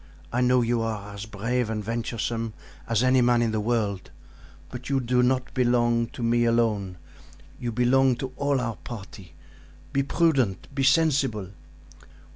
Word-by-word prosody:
I 125 - +1
know 125 0 +4
you 115 0 0
are 105 -2 -4
as 100 +2 -7
brave 115 +3 -1
and 105 -1 -3
venturesome 115 0 -3 0.3
as 115 +1 +2
any 130 0 +4
man 120 -1 +3
in 115 - 0
the 110 - -1
world, 105 -4 -1 0.6
but 125 +1 -8
you 135 -1 +2
do 125 0 +1
not 130 +1 0
belong 120 -2 +2
to 120 - -8
me 120 +1 +2
alone; 110 -6 +1 0.6
you 120 - -3
belong 125 +2 +3
to 130 +1 -6
all 140 0 0
our 115 -4 -3
party. 95 -6 -10 0.6
Be 140 - +2
prudent! 135 - +1 0.2
sensible!" 135 - +2
120 Hz, 150 wpm, -25 LUFS, 110-125 Hz, 0.6 s, know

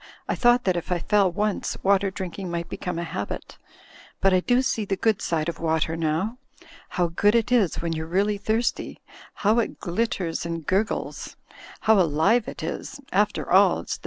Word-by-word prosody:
I - - 0
thought 240 0 +4
that 185 -2 +1
if 175 +1 -4
I 180 - +2
feU 200 +3 +3
once, 205 +3 -1
water 200 0 +3
drinking 190 -1 -6
might 170 0 -3
become 180 -2 -4
a 170 - -2
habit. 100 -11 -6 0.6
But 195 0 +3
I 185 - +5
do 245 +7 +2
see 225 -4 0
the 200 -1 -1
good 215 +1 +1
side 160 -2 -1
of 170 - -4
water 160 0 0
now. 165 +9 -1 0.5
How 180 - 0
good 205 +6 +2
it 235 +1 +1
is 210 -9 +2
when 165 -1 -1
you're 160 0 -4
really 200 +4 +1
thirsty, 220 +3 -1 0.5
how 220 +3 +5
it 230 - -2
glitters 180 -3 -2
and 165 -2 -4
gurgles! 195 +6 -2 0.5
How 220 -2 +4
alive 180 +9 +2
it - - -7
is! - - -5
After - - 0
all, - - +5
it's - - -4
the - - -30
190 Hz, 190 wpm, -25 LUFS, 170-215 Hz, 0.6 s, I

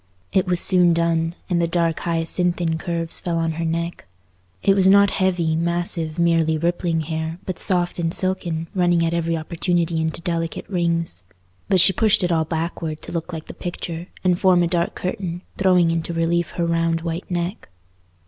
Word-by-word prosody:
It 190 - +2
was 180 -1 +3
soon 175 -2 +4
done, 165 0 0
and 175 -2 +1
the 170 - +2
dark 165 -1 0
hyacinthine 170 0 -1
curves 165 0 -1
fell 170 -1 -2
on 165 0 0
her 165 +1 -4
neck. 170 - -3 0.6
It 195 - +5
was 190 -1 +4
not 200 +1 +6
heavy, 175 -4 +1
massive, 170 -1 -1
merely 165 -2 +2
rippling 170 0 0
hair, 160 +1 -4
but 185 - -4
soft 175 -2 0
and 165 -1 0
silken, 175 -3 -1
running 175 -2 +2
at 165 - -1
every 165 -1 0
opportunity 170 0 -1
into 160 0 -2
delicate 165 -1 -3
rings. 170 - -1 0.5
But 190 -3 +5
she 190 - +5
pushed 215 -1 +3
it 175 - +1
all 160 -1 +2
backward 160 -1 -4
to - - -7
look 170 +1 -4
like 160 -2 -6
the - - -9
picture, 175 -1 -6 0.2
and 180 -1 +2
form 180 -2 +4
a - - +2
dark 170 0 -1
curtain, 180 -1 -4 0.2
throwing 180 -3 +4
into 165 +1 -2
relief 165 0 0
her 170 - +1
round 165 0 +1
white 170 +1 -4
neck. 175 +3 -3
170 Hz, 180 wpm, -22 LUFS, 165-180 Hz, 0.6 s, not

